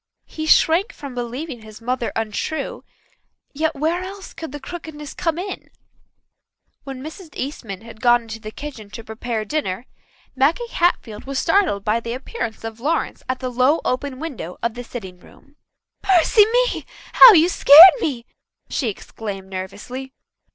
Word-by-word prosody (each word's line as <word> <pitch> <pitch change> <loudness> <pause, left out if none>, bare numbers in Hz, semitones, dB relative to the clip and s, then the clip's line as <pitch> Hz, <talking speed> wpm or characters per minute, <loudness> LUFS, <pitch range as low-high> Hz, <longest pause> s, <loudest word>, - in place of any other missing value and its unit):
He 315 0 -6
shrank 330 +6 +4
from 280 -3 -9
believing 245 +2 -5
his 215 -1 -12
mother 245 +1 -2
untrue, 225 +8 -3 0.7
yet 315 +2 -1
where 320 +5 0
else 390 +1 -9
could 320 -4 -8
the 290 - -7
crookedness 300 -1 -8
come 330 -1 -2
in? 380 +2 -6 1.1
When 270 -1 -8
Mrs. 320 +3 -9
Eastman 230 -9 -5
had 225 -1 -13
gone 240 -1 +3
to 225 0 -6
the 215 -1 -8
kitchen 230 -4 -9
to 230 - -9
prepare 220 0 -4
dinner, 235 -5 -3 0.5
Maggie 315 - +1
Hatfield 235 - -1
was 275 0 -4
startled 330 - +1
by 215 +2 +2
the 230 0 -5
appearance 255 - -5
of 225 0 -7
Lawrence 310 +7 -1
at 255 0 -2
the 255 -1 -3
low 255 +6 +3
open 260 +1 -2
window 255 - -6
of 235 -1 0
the 245 +1 -7
sitting 190 -7 -9
room. 280 +9 -20 0.5
"Mercy 390 +3 +5
me, - - +1 0.3
how - - +11
you 335 -2 +6
scared 345 +1 +10
me!" 255 - -3 0.5
she 250 - 0
exclaimed 195 -2 -7
nervously. 215 +8 -7
260 Hz, 155 wpm, -21 LUFS, 225-320 Hz, 1.1 s, how